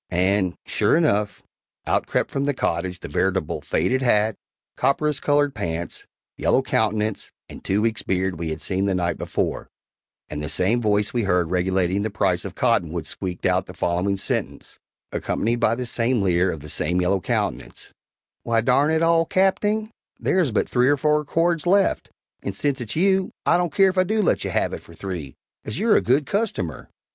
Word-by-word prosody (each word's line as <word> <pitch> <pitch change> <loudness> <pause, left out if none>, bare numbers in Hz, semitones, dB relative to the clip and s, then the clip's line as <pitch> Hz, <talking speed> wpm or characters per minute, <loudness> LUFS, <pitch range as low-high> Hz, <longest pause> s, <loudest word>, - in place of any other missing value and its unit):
And, 95 +1 +1
sure - - +2
enough, 105 -11 +1 0.4
out - - 0
crept - - 0
from 140 0 -1
the 145 -1 0
cottage 90 -4 -2
the - - -6
veritable 95 -3 -1
faded 95 +12 0
hat, 110 -4 +2 0.4
copperas 140 +2 +1
colored 145 -1 +2
pants, 85 0 -5 0.3
yellow 130 - +2
countenance 110 -3 -1 0.2
and - - -11
two 100 +3 0
weeks' 115 -1 0
beard 95 -2 -1
we 85 -1 -3
had 80 0 -4
seen 95 0 -1
the 95 -2 +1
night 85 -1 -1
before, - - -2 0.6
and 75 0 -5
the 75 - -4
same 110 +10 +1
voice 105 -2 +1
we 120 - +1
had 100 - -2
heard 90 -2 +1
regulating 95 +1 +1
the 110 - -1
price 95 -3 0
of 95 - -7
cottonwood 85 -10 0
squeaked 90 -2 -5
out 90 0 +1
the 90 - -10
following 90 +4 0
sentence, - - -4 0.3
accompanied 115 +3 -1
by 115 -1 +2
the 125 +1 -4
same 115 -1 0
leer 90 0 +2
of 80 - -7
the 75 - -10
same 85 +5 -1
yellow 95 +2 +1
countenance: - - -3 0.5
"Why, 115 -1 +1
darn 130 +5 +3
it 160 +1 +2
all, 165 0 +3
Capting, 205 +3 +1 0.3
there 190 - +1
is 155 -9 +2
but 105 - 0
three 125 0 +2
or 145 - +3
four 150 +1 +2
cords 165 +1 0
left, 195 +1 +2 0.3
and - - -4
since 140 -3 -1
it's 115 -2 -5
you, 190 +2 +2 0.2
I - - +4
don't 175 -2 +1
care 195 -1 +4
if 185 0 -1
I - - +5
do 215 +3 0
let - - +1
you - - -3
have - - 0
it - - -5
for - - -16
three 85 -9 -6 0.3
as 110 - -5
you're 225 0 +3
a - - +4
good 135 +4 +2
customer!" 195 - -2
110 Hz, 195 wpm, -23 LUFS, 90-145 Hz, 0.6 s, I